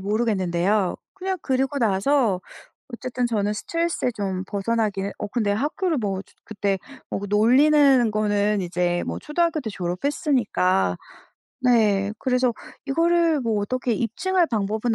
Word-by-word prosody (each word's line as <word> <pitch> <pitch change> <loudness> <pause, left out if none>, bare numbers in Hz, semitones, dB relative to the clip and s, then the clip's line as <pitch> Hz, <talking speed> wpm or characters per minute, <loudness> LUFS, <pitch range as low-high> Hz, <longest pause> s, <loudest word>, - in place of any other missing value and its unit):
모르겠는데요. 195 -2 0 0.2
그냥 380 0 -3
그리고 270 +1 0
나서 220 -1 +2 0.5
어쨌든 250 0 -2
저는 210 -3 0
스트레스에 335 +4 -1
좀 190 -3 -3
벗어나기는 205 -1 -1
어 - - -3
근데 215 -2 0
학교를 305 - -1
뭐 195 -3 -2
저 - - -26
그때 200 -2 -1 0.3
뭐 - - -2
그 205 - -5
놀리는 260 +3 +5
거는 210 -1 +1
이제 175 0 -1
뭐 - - -3
초등학교 325 0 0
때 220 - -5
졸업했으니까 190 - 0 0.7
네 210 -5 +3
그래서 250 -1 +1 0.3
이거를 330 +1 +2
뭐 225 -4 0
어떻게 250 +3 -1
입증할 345 - 0
방법은 220 +1 0
220 Hz, 310 characters per minute, -23 LUFS, 200-270 Hz, 0.7 s, 놀리는